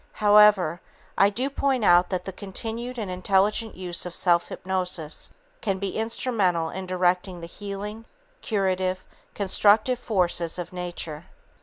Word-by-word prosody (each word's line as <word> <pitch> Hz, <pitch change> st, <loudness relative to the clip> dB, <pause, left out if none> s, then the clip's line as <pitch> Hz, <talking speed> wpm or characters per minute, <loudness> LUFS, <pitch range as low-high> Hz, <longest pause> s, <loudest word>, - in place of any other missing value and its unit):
However, 205 Hz, -5 st, +5 dB, 0.3 s
I 200 Hz, -, +5 dB
do 240 Hz, +6 st, -2 dB
point 270 Hz, -5 st, 0 dB
out 175 Hz, 0 st, +5 dB
that 180 Hz, -2 st, -3 dB
the 190 Hz, -, -4 dB
continued 225 Hz, +6 st, -6 dB
and 210 Hz, -5 st, -4 dB
intelligent 200 Hz, +4 st, +1 dB
use 180 Hz, -1 st, 0 dB
of 180 Hz, -1 st, -3 dB
self 175 Hz, -2 st, +2 dB
hypnosis 180 Hz, -4 st, -1 dB, 0.3 s
can 195 Hz, -3 st, -1 dB
be 195 Hz, 0 st, -4 dB
instrumental 210 Hz, -7 st, 0 dB
in 190 Hz, 0 st, -6 dB
directing 180 Hz, 0 st, 0 dB
the 170 Hz, -, -7 dB
healing, 205 Hz, +4 st, -7 dB, 0.4 s
curative, 185 Hz, -3 st, -1 dB, 0.3 s
constructive 210 Hz, +5 st, +3 dB
forces 175 Hz, -7 st, -1 dB
of 175 Hz, +1 st, -6 dB
nature. 175 Hz, -3 st, -5 dB
190 Hz, 135 wpm, -25 LUFS, 180-210 Hz, 0.4 s, However